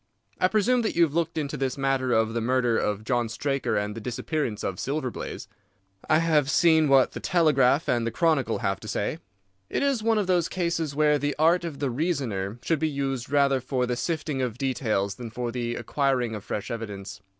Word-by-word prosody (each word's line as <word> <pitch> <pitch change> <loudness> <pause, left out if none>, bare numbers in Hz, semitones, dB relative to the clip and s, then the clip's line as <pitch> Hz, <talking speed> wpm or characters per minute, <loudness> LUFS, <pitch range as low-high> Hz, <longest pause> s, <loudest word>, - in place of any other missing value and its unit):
I 185 - +4
presume 220 +5 +2
that 220 - -2
you 170 - +5
have 155 -4 +1
looked 165 0 -1
into 145 -3 -2
this 135 +1 -2
matter 135 -2 0
of 110 -1 +2
the 115 - -1
murder 125 0 +1
of 105 -1 -1
John 120 -1 0
Straker 135 +3 -1
and 105 0 -2
the 115 - -7
disappearance 125 0 -3
of 90 - -3
Silver 135 -2 -2
Blaze?" - - -7 0.6
"I 155 - +5
have 155 -4 +2
seen 160 -1 +4
what 135 -1 +5
the - - -6
Telegraph 150 -5 +3
and 120 -2 +1
the - - +1
Chronicle 145 -5 +1
have 95 - 0
to 110 - -10
say." 105 +9 -2 0.5
"It - - -1
is 275 -5 +1
one 225 0 +2
of 210 - +1
those 180 -3 +1
cases 170 -5 -2
where 150 -1 +3
the 145 0 -1
art 165 +3 +3
of 165 -4 -5
the 140 -3 -1
reasoner 120 - -2
should 165 -3 +1
be 160 +1 +1
used 135 -4 -3
rather 140 -2 +3
for 125 0 -1
the 125 0 -1
sifting 155 -1 -2
of 120 -3 -2
details 115 -7 -1
than 120 0 -8
for 120 +1 -4
the 120 -1 -3
acquiring 125 -1 0
of 105 -2 -6
fresh 105 -1 -4
evidence. 105 -4 -6
135 Hz, 210 wpm, -26 LUFS, 120-155 Hz, 0.6 s, you